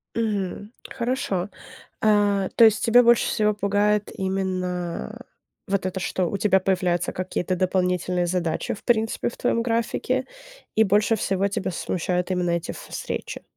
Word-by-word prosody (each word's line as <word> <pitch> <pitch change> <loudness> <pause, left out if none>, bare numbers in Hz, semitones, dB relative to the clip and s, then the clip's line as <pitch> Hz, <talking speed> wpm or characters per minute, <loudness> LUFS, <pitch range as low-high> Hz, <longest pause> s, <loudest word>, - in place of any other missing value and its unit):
Мгм, 205 -2 -2 0.2
хорошо. 220 -6 -2 0.5
А, 205 -2 +3
то 230 - +8
есть 215 -2 +4
тебя 245 +1 +6
больше 235 -1 +4
всего 210 -1 +1
пугает 205 +1 +1
именно 185 - -3 0.5
вот 195 -1 -1
это, 185 0 -3
что? 185 -1 -1
У 200 - -2
тебя 195 -1 +3
появляются 180 -2 0
какие-то 185 0 -2
дополнительные 180 -1 0
задачи, 170 -2 -1
в - - -14
принципе, 225 -2 +1
в - - -9
твоём 230 - +1
графике, 240 +2 -1 0.5
и 220 - +6
больше 210 +3 +3
всего 195 -1 0
тебя 200 -1 -2
смущают 180 +1 -2
именно 180 -1 0
эти 170 0 -1
ф - - -9
встречи. - - -5
195 Hz, 145 wpm, -24 LUFS, 180-215 Hz, 0.5 s, то